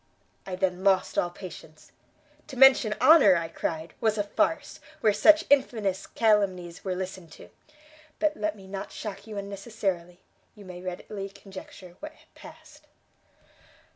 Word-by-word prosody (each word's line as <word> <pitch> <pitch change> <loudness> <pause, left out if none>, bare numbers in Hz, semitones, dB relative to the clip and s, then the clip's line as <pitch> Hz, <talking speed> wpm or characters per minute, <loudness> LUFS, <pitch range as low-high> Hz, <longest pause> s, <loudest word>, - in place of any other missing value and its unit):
I 185 - -4
then 185 0 -1
lost 190 -2 +2
all 175 - 0
patience; 175 -4 -12 0.6
to 265 - -9
mention 260 -5 +6
honour, 295 - +7
I 165 -1 -1
cried, 160 0 -4
was 220 -1 +1
a 205 - +1
farce, 205 - -1 0.2
where 215 - +4
such 315 +8 +5
infamous 220 -9 +1
calumnies 190 -6 0
were 185 -2 -2
listened 185 -2 -6
to; - - -14 0.7
but 310 -1 +1
let 210 0 -2
me 195 -2 -14
not 195 0 -7
shock 210 +1 -7
you 215 -2 -7
unnecessarily, 195 -3 -4 0.4
you 205 -2 -14
may 180 -1 -9
readily 195 +2 -6
conjecture 190 -2 -12
what 310 +1 -8 0.2
passed." - - -15
195 Hz, 140 wpm, -27 LUFS, 180-215 Hz, 0.7 s, honour